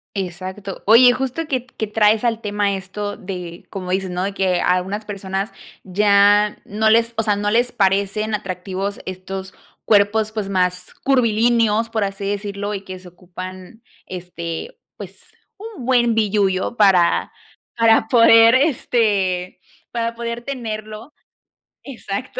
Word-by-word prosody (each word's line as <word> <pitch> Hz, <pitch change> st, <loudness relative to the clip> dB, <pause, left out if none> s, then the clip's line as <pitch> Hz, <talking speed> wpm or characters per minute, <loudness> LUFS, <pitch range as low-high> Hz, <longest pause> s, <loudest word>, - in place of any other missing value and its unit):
Exacto. 190 Hz, +1 st, -6 dB
Oye, 245 Hz, +3 st, +7 dB
justo 265 Hz, +5 st, -3 dB
que 255 Hz, -3 st, -2 dB
que 225 Hz, -3 st, -5 dB
traes 210 Hz, +1 st, +2 dB
al 230 Hz, -1 st, 0 dB
tema 205 Hz, -1 st, -1 dB
esto 205 Hz, +2 st, -5 dB
de 180 Hz, -4 st, -8 dB
como 185 Hz, -2 st, -6 dB
dices, 190 Hz, 0 st, -1 dB
¿no?, 180 Hz, +1 st, -3 dB
de 200 Hz, -, -2 dB
que 185 Hz, -2 st, 0 dB
a 180 Hz, -, +2 dB
algunas 195 Hz, +4 st, -3 dB
personas 195 Hz, 0 st, -4 dB, 0.3 s
ya 205 Hz, +2 st, +3 dB
no 220 Hz, +2 st, +1 dB
les, 230 Hz, +1 st, +3 dB
o 225 Hz, -, +1 dB
sea, 210 Hz, -1 st, +1 dB
no 205 Hz, 0 st, -1 dB
les 240 Hz, +2 st, +2 dB
parecen 200 Hz, +1 st, 0 dB
atractivos 195 Hz, 0 st, -4 dB
estos 190 Hz, +1 st, -7 dB, 0.3 s
cuerpos, 210 Hz, +1 st, +3 dB
pues, 215 Hz, -3 st, -4 dB
más 180 Hz, -1 st, -1 dB
curvilíneos, 230 Hz, -3 st, +2 dB
por 220 Hz, -2 st, -1 dB
así 195 Hz, 0 st, -4 dB
decirlo, 205 Hz, 0 st, -3 dB
y 195 Hz, -, -4 dB
que 185 Hz, -1 st, -8 dB
se 185 Hz, -, -14 dB
ocupan, 185 Hz, +4 st, -10 dB, 0.2 s
este, 175 Hz, -, -7 dB, 0.2 s
pues, -, -, -9 dB, 0.3 s
un 415 Hz, -, -9 dB
buen 240 Hz, -3 st, +3 dB
billullo 205 Hz, -1 st, 0 dB
para 190 Hz, -6 st, +3 dB, 0.5 s
para 225 Hz, -1 st, +4 dB
poder 230 Hz, -1 st, +6 dB
este, 205 Hz, -, 0 dB, 0.3 s
para 230 Hz, 0 st, -2 dB
poder 235 Hz, 0 st, -5 dB
tenerlo. 225 Hz, -1 st, -6 dB, 0.7 s
Exacto, 245 Hz, -3 st, -6 dB
205 Hz, 140 wpm, -20 LUFS, 190-230 Hz, 0.7 s, Oye